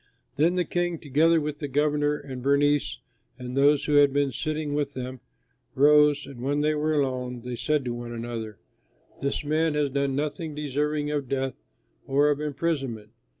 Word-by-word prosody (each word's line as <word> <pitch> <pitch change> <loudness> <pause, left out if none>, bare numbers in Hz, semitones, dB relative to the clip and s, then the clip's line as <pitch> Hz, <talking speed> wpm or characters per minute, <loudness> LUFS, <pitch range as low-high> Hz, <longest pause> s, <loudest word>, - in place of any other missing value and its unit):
Then 165 +5 +3
the 180 -1 +1
King, 175 +1 -1
together 160 +3 +3
with 150 -1 -4
the 145 - -3
governor 145 +1 +1
and 130 -3 -8
Bernice 140 0 +2 0.4
and 125 -1 -6
those 145 +1 +4
who 150 -1 +3
had 145 -1 +6
been 140 0 +1
sitting 155 +1 -3
with 145 -1 -2
them, 130 0 -5 0.6
rose 150 +1 +5
and, 135 -4 -10
when 145 +3 0
they 155 +1 +2
were 155 +1 0
alone, 125 -3 -1
they 125 +1 -5
said 150 +2 0
to 120 - -2
one 120 0 -6
another, 115 -2 -5 0.6
"This 140 +1 -1
man 155 +1 +1
has 145 -2 +1
done 140 0 0
nothing 150 +2 -3
deserving 150 +1 -1
of 145 -4 -2
death 135 -1 -1 0.5
or 145 +2 +3
of 145 0 -1
imprisonment." 135 -8 -2
145 Hz, 175 wpm, -26 LUFS, 130-150 Hz, 0.6 s, had